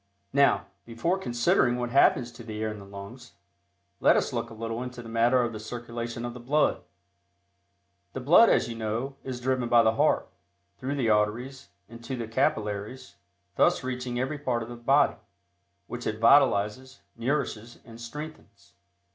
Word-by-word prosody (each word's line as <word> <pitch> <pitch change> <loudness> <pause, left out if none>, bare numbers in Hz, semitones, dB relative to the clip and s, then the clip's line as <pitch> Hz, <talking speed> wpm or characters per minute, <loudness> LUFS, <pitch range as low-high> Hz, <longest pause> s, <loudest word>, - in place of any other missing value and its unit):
Now, 140 0 +4 0.2
before 145 +12 -1
considering 120 -3 +2
what 120 -1 -3
happens 125 -2 +4
to 120 - -12
the 110 -2 -7
air 110 - -1
in 105 - -8
the 100 - -12
lungs, 100 +5 -11 0.7
let - - +5
us - - -1
look 115 - -2
a 115 - -11
little 115 +1 -4
into 125 -1 -7
the 115 - -10
matter 120 +2 +3
of 115 -1 -2
the 110 - -6
circulation 120 +1 -6
of 120 - -5
the 125 - -9
blood. 140 0 +1 1.3
The - - -4
blood, 165 - +6
as - - +3
you 120 - -5
know, 115 +4 -3
is 130 -2 -5
driven 125 -1 -1
by 120 -1 +6
the 110 - +4
heart, - - +2 0.5
through 135 +2 -3
the 120 -6 +1
arteries, 115 +6 -1 0.2
into 115 +3 -7
the 115 -2 -5
capillaries, 110 -2 -2 0.4
thus 175 -5 +3
reaching 125 -1 -3
every 135 +4 -2
part 125 -5 -1
of 115 - -9
the 120 - -7
body, 135 +5 +3 0.7
which - - -6
it - - -3
vitalizes, 130 +7 +3
nourishes 120 -2 -2
and 115 0 -12
strengthens. 150 +7 -10
120 Hz, 170 wpm, -27 LUFS, 115-130 Hz, 1.3 s, blood